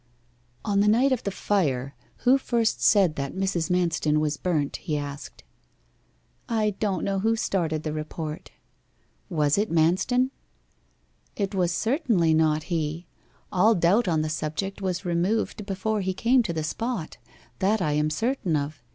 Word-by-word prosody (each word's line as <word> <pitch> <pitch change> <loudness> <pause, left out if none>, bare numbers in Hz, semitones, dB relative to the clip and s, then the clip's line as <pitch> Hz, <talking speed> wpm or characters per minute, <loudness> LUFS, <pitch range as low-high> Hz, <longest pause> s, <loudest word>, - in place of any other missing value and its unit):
'On 200 -2 +1
the 205 - +3
night 245 +6 +4
of 255 - +1
the - - +1
fire, 145 -10 -1 0.3
who 260 +2 +6
first 235 -4 0
said 190 -7 +4
that 140 +3 -4
Mrs. 190 -3 -1
Manston 165 -4 +1
was 150 -1 0
burnt?' 150 -4 -1
he 150 - -3
asked. 145 0 -7 1.1
'I 220 -2 +1
don't 200 -4 -1
know 195 -1 0
who 225 +3 +2
started 165 -8 -1
the 155 - -3
report.' 155 0 -5 0.8
'Was 150 -1 +2
it 215 - 0
Manston?' 185 +11 +2 1.0
'It 200 -1 -2
was 180 -3 +1
certainly 220 - +1
not 155 -1 +2
he. 160 +1 -2 0.5
All 215 +5 +4
doubt 185 +6 +3
on 160 -3 +1
the 155 - -2
subject 155 +6 -3
was 185 0 -2
removed 195 +4 -1
before 205 +2 -1
he 190 -1 -2
came 245 +5 +3
to 200 - -2
the 160 -1 -2
spot 210 +2 -3 0.4
that 210 +3 +2
I 155 -5 0
am 150 +1 +1
certain 220 - -1
of. 145 -1 -3
180 Hz, 155 wpm, -25 LUFS, 155-210 Hz, 1.1 s, who